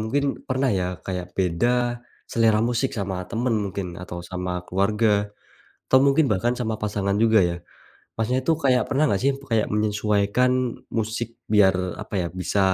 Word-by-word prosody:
mungkin 115 +7 0 0.3
pernah 130 +1 +1
ya, 90 - 0 0.2
kayak 90 -2 -3
beda 90 +4 +1 0.6
selera 115 -2 +3
musik 125 +2 0
sama 95 -2 -2
temen 120 +1 0
mungkin 100 -1 -4 0.2
atau 85 -1 -7
sama 90 0 -3 0.2
keluarga, 105 +4 +1 0.8
atau 130 - +5
mungkin 140 +3 +4
bahkan 115 +5 +1
sama 110 -3 -1
pasangan 100 -2 -1
juga 110 -1 +5
ya. - - -3 0.6
Masnya, 115 +3 0
itu 165 - +3
kayak 130 -2 +4
pernah 140 +2 +2
nggak 100 -7 +1
sih, 135 - +3
itu 140 +1 -10
kayak 110 -2 +2
menyesuaikan 105 +3 +1 0.5
musik 110 +1 -1 0.3
biar 100 -3 +6 0.3
apa 110 - -10
ya, 85 - -2
bisa 100 - 0
110 Hz, 160 wpm, -24 LUFS, 100-125 Hz, 0.8 s, biar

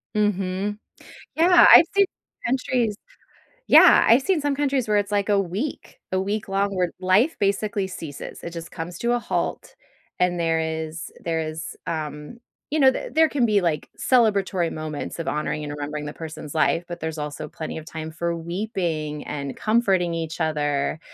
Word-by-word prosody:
Mhm. 205 0 -1 0.6
Yeah. 345 +2 +7
I've 335 - +10
seen 400 - +5 0.4
countries 245 -4 0 0.8
yeah, - - +8
I 230 - +7
seen 325 +4 0
some 285 -1 0
countries 275 -4 0
where 210 -1 +2
it's 205 0 -1
like 205 0 0
a 205 -1 +4
week, 195 - -4
a 185 - +1
week 200 +2 -2
long 195 0 0
where 180 -1 +1
life 195 - +3
basically 200 0 0
ceases. 160 -6 -8
It 170 - -4
just 170 -1 -8
comes 170 +1 -6
to 235 0 0
a 245 - +1
halt, - - -3 0.4
and 180 -1 +1
there 165 -1 +1
is 160 0 -4
there 165 -1 -1
is, 160 +1 -5
um, 150 +5 -5 0.3
you 310 - +1
know, 265 -2 +7
th - - -6
there 320 0 +5
can 260 -5 +1
be, 210 -3 +3
like, 160 -4 -1
celebratory 200 -8 +2
moments 155 0 -5
of 165 - -4
honoring 150 0 -2
and 145 - -5
remembering 150 +1 -5
the 145 - -6
person's 160 -2 -8
life, 165 +2 +2
but 175 0 -7
there's 160 0 -4
also 150 +1 -5
plenty 155 +1 -6
of 160 - -8
time 160 -1 -6
for 170 +1 -2
weeping 170 -4 -3
and 140 -2 -4
comforting 195 -6 +1
each 165 0 -4
other. 150 -1 0
175 Hz, 175 wpm, -23 LUFS, 160-210 Hz, 0.8 s, I've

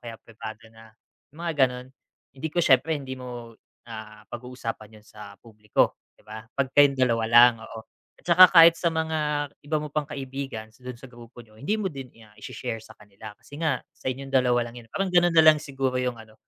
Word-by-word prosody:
kaya 115 -1 -9
pribado 110 0 -11
na 110 -1 -17 0.4
mga 170 0 -4
gano'n, 125 0 -8 0.5
hindi 135 +4 -5
ko 155 - -18
siyempre 145 +4 +3
hindi 130 -2 -7
mo, 120 -2 -9 0.3
ah, 110 -2 -10
pag-uusapan 115 -3 -7
'yon 105 - -19
sa 100 -2 -12
publiko 105 -2 0 0.2
'di - - -27
ba, 110 +1 -9 0.2
'pag 135 -1 -1
kayong 140 -1 +5
dalawa 115 -3 +1
lang, 120 +1 +7
oo. 110 0 -9 0.4
At - - -25
tsaka 180 +1 +8
kahit 165 -1 +8
sa 170 0 -1
mga 155 -2 -1 0.2
iba 155 +2 -2
mo 150 -1 -8
pang 150 - +1
kaibigan 135 -6 -7
sa 125 - -25
dun 125 -1 -8
sa 135 - -12
grupo 120 -1 -15
niyo, 110 -1 -22
hindi 180 - -2
mo 205 - -2
din, 135 -3 -9 0.2
ah, 105 - -23
i-share 115 -3 -6
sa - - -16
kanila 105 0 -13
kasi 145 - -13
nga 150 -5 +1 0.2
sa 130 - -4
inyong 135 +1 -7
dalawa 125 -2 +2
lang 120 0 -10
yun, 115 - -21
parang 195 - -2
ganun 175 -1 +4
na 160 - +7
lang 155 -1 +7
siguro 135 -2 -3
yung 125 -2 -3
ano, 110 -1 -15
125 Hz, 210 wpm, -25 LUFS, 115-145 Hz, 0.5 s, tsaka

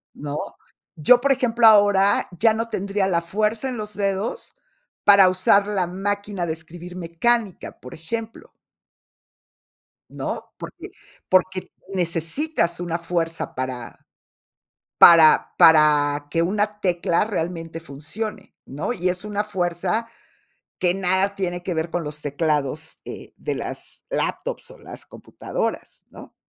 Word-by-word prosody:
¿no? 145 0 -5 0.6
Yo, 240 +11 +5
por 280 0 +2
ejemplo, 240 -3 +3
ahora, 205 -2 +5
ya 225 0 +4
no 230 +1 -3
tendría 195 0 -1
la 170 -2 +1
fuerza 215 +8 -1
en 245 - -5
los 210 -1 -6
dedos 200 - -3 0.5
para 200 -2 +7
usar 190 +2 +3
la 195 -4 0
máquina 200 0 -3
de 160 - -2
escribir 175 +2 -11
mecánica, 185 +5 -1
por 125 - -11
ejemplo 225 +8 -7 1.6
¿no? - - -6
Porque - - -9 0.4
porque 185 0 +1 0.2
necesitas 170 - -1
una 170 -1 -2
fuerza 165 -1 -3
para 130 -2 -6 0.9
para 165 -2 +7
para 150 -2 +5
que 165 +1 0
una 210 +3 -1
tecla 175 -1 +1
realmente 165 -4 -4
funcione, 165 +8 -6
¿no? 145 - -4
Y 180 -3 -1
es 180 +3 -3
una 210 0 -2
fuerza 185 +3 -2 0.7
que 180 -1 +2
nada 190 +1 0
tiene 180 -2 -3
que 180 - -3
ver 160 +1 -2
con 175 - -2
los 150 0 -6
teclados, 150 +1 -2
eh, - - -9
de - - -4
las - - -7
laptops - - -3
o - - -15
las - - -11
computadoras, - - -5
¿no? - - -14
185 Hz, 130 wpm, -22 LUFS, 165-210 Hz, 1.6 s, para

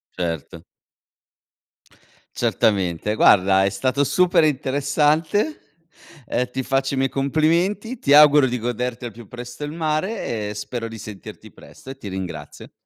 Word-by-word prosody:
Certo. 85 -5 -4 1.7
Certamente. 100 0 0
Guarda 95 -2 +5
è 100 - +2
stato 130 +8 0
super 180 -1 +3
interessante, 150 - 0 0.5
ehm, 125 +1 -1
ti 130 +1 -4
faccio 135 +1 0
i - - -2
miei 135 0 +1
complimenti, 170 - 0
ti 140 - +2
auguro 150 -1 +7
di 125 -1 -1
goderti 120 +1 -3
al 120 - -5
più 115 +1 -13
presto 125 +5 -8
il 145 - -6
mare 155 - -2
e - - -5
spero 115 +2 -5
di 115 0 -9
sentirti 105 -4 -10
presto - - -15
e 135 - -8
ti 105 - -9
ringrazio. 90 -6 -7
130 Hz, 140 wpm, -22 LUFS, 105-150 Hz, 1.7 s, auguro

